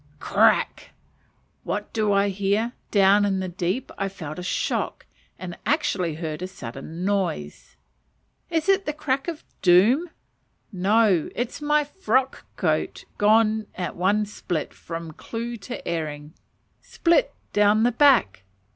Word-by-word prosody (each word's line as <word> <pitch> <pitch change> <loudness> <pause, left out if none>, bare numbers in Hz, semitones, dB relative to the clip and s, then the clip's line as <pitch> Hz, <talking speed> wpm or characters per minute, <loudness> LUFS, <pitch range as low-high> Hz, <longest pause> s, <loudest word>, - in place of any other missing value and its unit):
Crack! - - +2 0.7
What - - -4
do 215 -2 +1
I 200 0 +3
hear? 200 +4 0 0.2
Down 200 0 +5
in 195 -2 +1
the 190 - -2
deep 185 +7 -3
I 195 0 -1
felt 160 -5 -7
a - - -4
shock, 180 - -2 0.3
and 175 -2 -7
actually 190 - 0
heard 160 0 -5
a 185 - -3
sudden 160 +2 -7
noise. 185 - -2 0.7
Is 325 +1 -1
it 390 -2 +3
the 300 - 0
"crack 275 -2 -2
of 330 -3 -5 0.2
doom?" 215 - +5 0.6
No, 195 -2 +2
it 245 0 -1
is 285 - -10
my 300 0 +3
frock 265 - -1
coat - - -1
gone 215 0 +3
at 180 -1 -4
one 205 +4 +2
split 180 -5 -4
"from 165 -1 -7
clue 235 +8 -6
to 240 +4 -8
earing" 150 -2 -4 0.5
split 360 +9 +1 0.2
down 210 +1 +4
the 245 - +3
back. 245 - +4
205 Hz, 140 wpm, -24 LUFS, 180-245 Hz, 0.7 s, Down